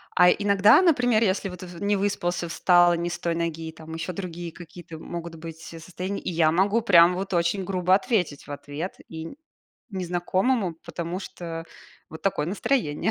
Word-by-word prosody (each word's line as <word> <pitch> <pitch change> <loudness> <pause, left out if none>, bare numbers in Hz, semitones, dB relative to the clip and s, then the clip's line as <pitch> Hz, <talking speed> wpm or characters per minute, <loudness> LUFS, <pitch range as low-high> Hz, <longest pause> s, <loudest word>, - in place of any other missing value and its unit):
А 180 0 +7
иногда, 205 - +5
например, 245 -10 +3
если 195 -1 0
вот 180 0 -9
в 175 -1 -10
не 205 0 +2
выспался, 180 -3 -1
встал 175 0 +4
не 170 +1 -2
с 175 - -5
той 170 -1 -1
ноги, 165 -1 -3
там 160 0 -11
ещё 165 +2 -4
другие 175 -2 -6
какие-то 170 -1 -11
могут 170 +1 -7
быть 165 0 -9
состояния, 180 +4 -6
и - - -4
я 160 -2 +3
могу 200 +7 +2
прямо 180 -4 +6
вот 195 +1 -4
очень 175 +3 +1
грубо 185 0 +2
ответить 190 - -1
в - - -8
ответ 145 +5 -6
и 160 0 -7
н - - -10 0.6
незнакомому, 185 +2 0
потому 170 +2 -4
что 165 -3 -7 0.4
вот 160 - -11
такое 160 -6 0
настроение 195 - 0
175 Hz, 175 wpm, -25 LUFS, 165-195 Hz, 0.6 s, А